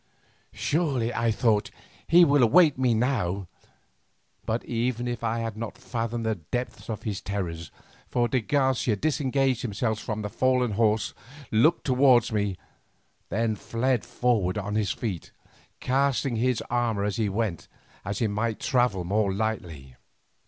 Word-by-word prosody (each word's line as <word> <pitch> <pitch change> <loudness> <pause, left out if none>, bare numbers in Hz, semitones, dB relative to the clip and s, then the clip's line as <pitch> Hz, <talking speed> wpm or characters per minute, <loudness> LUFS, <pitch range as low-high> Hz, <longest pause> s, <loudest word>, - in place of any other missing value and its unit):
Surely, 140 -7 0
I 115 0 +1
thought, 110 -2 +1 0.4
he 175 +1 +7
will 145 -2 +4
await 145 +6 +6
me 125 -3 +2
now. 105 -6 0 1.0
But 115 +2 -1
even 120 +1 -1
I 115 0 -1
had 115 -2 -4
not 115 +1 -6
fathomed 115 -2 -3
the 110 - +1
depth 110 +10 -5
of 110 - -4
his 105 -3 -3
terrors, 85 -5 -4 0.4
for 120 -1 +1
de 130 0 0
Garcia 130 -3 +1
disengaged 135 0 0
himself 110 -1 -1
from 110 -1 -4
the 105 - -3
fallen 125 0 +1
horse, 110 0 +1 0.4
looked 150 +11 +3
towards 125 -3 +4
me, 100 -3 -1 0.7
then 110 +1 0
fled 120 +3 -1
forward 110 -7 0
on 100 0 -3
his 105 -3 0
feet, 100 -8 -4 0.5
casting 135 0 +1
away 115 - -1
his 125 -3 0
armour 120 -4 0
as 105 +1 -1
he 110 -3 +1
went 100 -4 -2 0.4
that 100 0 -3
he 115 - +1
might 110 +1 -1
travel 120 -8 +1
more 100 +3 +1
lightly. 90 - -4
115 Hz, 145 wpm, -26 LUFS, 105-125 Hz, 1.0 s, he